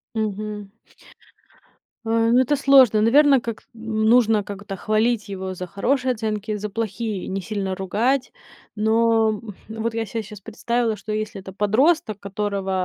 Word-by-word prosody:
Мгм. 210 -1 -4 1.3
А, 230 0 +2
ну, 245 - +5
это 270 +3 +2
сложно. 260 -6 +5
Наверно, 275 +3 +5
как, 230 -2 -6
м, 220 -1 -3
нужно 225 -3 +4
как-то 200 0 -7
хвалить 215 +1 0
его 190 -1 -5
за 180 0 -6
хорошие 255 +7 0
оценки, 215 -1 -3
за 210 0 -5
плохие 215 -2 -3
не 195 0 -3
сильно 195 -2 -3
ругать. 225 +8 0 0.4
Но 220 0 +2 0.3
вот 225 +1 -3
я 225 -1 -2
се 225 +3 -4
щас 210 -1 -11
представила, 230 +1 -1
что 215 +1 -6
если 215 -2 -3
это 190 - -10
подросток, 215 - +2
которого, 200 -1 -3
215 Hz, 145 wpm, -22 LUFS, 205-230 Hz, 1.3 s, ну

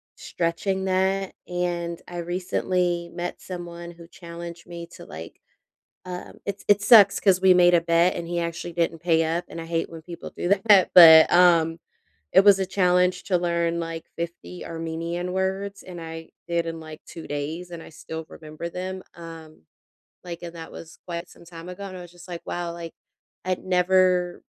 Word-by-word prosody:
stretching 190 +3 -2
that, 190 +1 0
and 175 -1 -3
I 175 - -8
recently 175 0 -1
met 175 0 -5
someone 175 -1 -8
who 170 -1 -14
challenged 170 -1 -10
me 170 -1 -8
to - - -12
like, 80 +2 -10 0.7
um 180 0 -7
it 200 0 -5
it 205 0 +4
sucks 205 -2 +7
'cause 185 -2 +3
we 190 -1 +6
made 175 0 +5
a 170 - +5
bet 170 +2 +3
and 170 - -5
he 175 0 -2
actually 170 0 -4
didn't 165 -1 -1
pay 165 -1 +2
up, 165 +2 -2
and - - -8
I - - -7
hate 165 0 -2
when 165 -1 -10
people 170 +1 -9
do 175 - -3 0.2
that 200 -4 +6
but, 160 -3 +10
um, 170 -2 +4 0.5
it - - +8
was 200 -1 +7
a 190 - -1
challenge 180 -1 +2
to 185 - +1
learn 170 -1 0
like 165 -1 -6
50 170 +1 -6
Armenian 165 +2 -4
words, 190 +1 -2
and 180 -2 -9
I 165 0 -8 0.2
did 170 -1 0
in, 165 0 -5
like, 155 -1 -11
2 165 - -10
days 155 +5 -5
and 170 -1 -8
I - - -12
still 160 +1 -8
remember 155 +1 -8
them, 185 +2 -6
um, 165 - -11 0.6
like, 170 -2 -7
and 170 -1 -7
that 165 -1 -9
was 165 +1 -12
quite 170 0 -5
some - - -17
time 165 0 -11
ago 180 +2 -8
and 185 -1 -8
I - - -8
was 175 -1 -12
just 175 0 -15
like, 175 -2 -7
"Wow, 175 -1 -4
like, 170 -1 -8 0.5
I'd 185 0 -2
never 180 -1 +2
175 Hz, 185 wpm, -24 LUFS, 165-180 Hz, 0.7 s, but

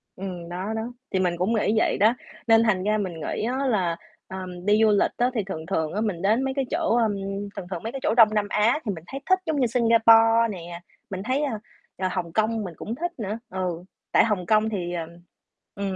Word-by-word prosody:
Ừm, 180 -3 -6
đó, 185 +5 -4
đó, 220 - -2 0.3
thì 190 - +1
mình 180 -2 +1
cũng 190 +6 0
nghĩ 215 -1 +1
vậy - - +2
đó. 220 +4 +4 0.3
Nên 225 0 +6
thành 190 -4 +1
ra 215 +1 +1
mình 190 -4 -3
nghĩ 160 +6 -4
á 260 +4 -1
là, 180 -8 +1 0.3
ờm, 185 -1 -7
đi 210 +1 +4
du 215 - +5
lịch 205 - +3
á 245 +1 +2
thì 220 -4 -1
thường 160 -4 -6
thường 160 -3 -1
á 210 - -1
mình 195 -6 -2
đến 220 +6 +2
mấy 265 0 -1
cái 270 -1 -1
chỗ, 325 -7 +1
ơm 225 -3 +2 0.4
thường 175 - -6
thường 175 +1 -4
mấy 225 - -3
cái 270 - -5
chỗ 220 - +2
Đông 220 -3 +6
Nam 210 -1 +1
Á 225 +8 +2
thì 205 - 0
mình 165 -3 -7
thấy 275 - -6
thích 375 - +5
giống 310 -3 0
như 250 - +3
Singapore 230 -1 +5
nè. 175 -1 -8 0.3
Mình 190 0 -5
thấy, 260 +5 0
a, 230 -7 -2 0.4
à, 185 -1 -1
Hồng 170 -1 -3
Kông 220 0 +1
mình 180 -3 -6
cũng 230 - -5
thích 345 +4 -3
nữa, 215 +1 -3
ừ. 180 -2 -3 0.3
Tại - - +5
Hồng 205 -6 -1
Kông 215 0 +3
thì, 180 -4 -3
ờm 165 -1 -4 0.7
ừm, 195 -1 -3
210 Hz, 240 wpm, -25 LUFS, 185-230 Hz, 0.7 s, Nên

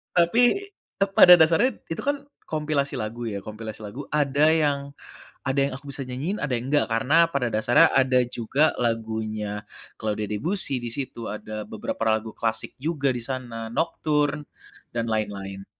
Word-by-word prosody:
Tapi, 175 +8 +4 0.6
eee, 195 - -1
pada 180 -2 +9
dasarnya 170 +9 +4 0.2
itu 165 - -3
kan 285 0 -1 0.2
kompilasi 150 -2 -1
lagu 115 +2 -4
ya, 100 -3 -4
kompilasi 110 0 -7
lagu 115 +7 -7
ada 145 0 +2
yang 145 -3 +1 0.5
ada 135 +1 +1
yang - - -9
aku 145 - -18
bisa 140 - -3
nyanyiin 135 +11 -4
ada 150 - -2
yang 120 - -6
enggak 145 -5 +2
karena 145 +9 +3
pada 140 -3 0
dasarnya 115 +1 +4
ada 130 -1 +4
juga 125 +6 +1
lagunya 110 -3 -2 0.3
Claude 105 -1 -3
Debussy 135 - -1
di 120 - -4
situ 120 -3 -5
ada 110 +1 -6
beberapa 110 0 -6
lagu 110 0 0
klasik 110 -1 -2
juga 140 -2 -1
di 120 - -4
sana, 115 -3 -5
Nocturne, 150 0 0 0.4
dan 115 -1 -2
lain-lain. 100 -3 -3
125 Hz, 155 wpm, -25 LUFS, 110-150 Hz, 0.6 s, pada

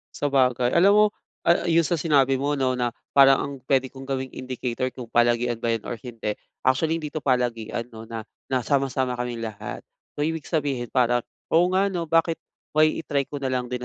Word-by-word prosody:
Sabagay, 125 -3 +2
alam 185 +4 +6
mo, 210 +1 +6 0.4
ah, 170 - +4
yung 165 -1 +4
sa 175 - 0
sinabi 140 -4 +3
mo 140 +2 -1
'no, 130 -1 +1
na 125 -1 0 0.2
parang 135 -1 +7
ang 140 - -3 0.2
pwede 135 -1 +3
kong 135 - -9
gawing 130 -1 -2
indicator 130 0 -3
kung 125 -1 -9
palagian 120 0 +2
ba 115 - +1
yun 115 -2 -2
or - - -3
hindi. 115 -3 -4 0.3
Actually, 160 +5 +2
hindi 150 -2 -5
'to 155 - -3
palagian 120 -3 -1
'no, 110 - -8
na 110 -1 -6 0.2
na 130 - +2
sama-sama 135 -2 +1
kaming 120 -1 -4
lahat. 110 -2 -7 0.3
So, 145 - +1
ibig 160 -1 -3
sabihin, 140 -7 -1
parang 120 -1 +2 0.3
oo 175 +2 +5
nga 190 +2 +3
'no, 170 -5 -3
bakit 165 0 +3 0.4
why 155 0 +6
i-try 145 -3 -1
ko 145 - -6
na 140 - -3
lang 125 -1 -2
din 125 - -2
130 Hz, 200 wpm, -24 LUFS, 120-150 Hz, 0.4 s, parang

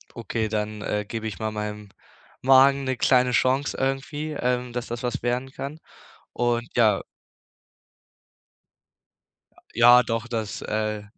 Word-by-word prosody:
Okay, 115 -1 -2
dann, 105 -1 -3
äh, 105 0 -2
gebe 110 +1 -5
ich 105 - -6
mal 110 0 -2
meinem 105 -1 -5 0.5
Magen 135 +1 +5
'ne 130 -1 -1
kleine 125 -1 +3
Chance 130 +4 +1
irgendwie, 135 +3 -2
ähm, 125 -3 -2
dass 125 0 -4
das 120 +2 -6
was 120 - -2
werden 125 +2 -2
kann 140 +3 -7 0.5
und 120 0 0
ja 110 -4 +4 2.7
Ja, 120 +2 +7
doch, 115 0 -3
das 110 -3 -4
äh, 105 -1 -2
120 Hz, 130 wpm, -24 LUFS, 110-130 Hz, 2.7 s, Ja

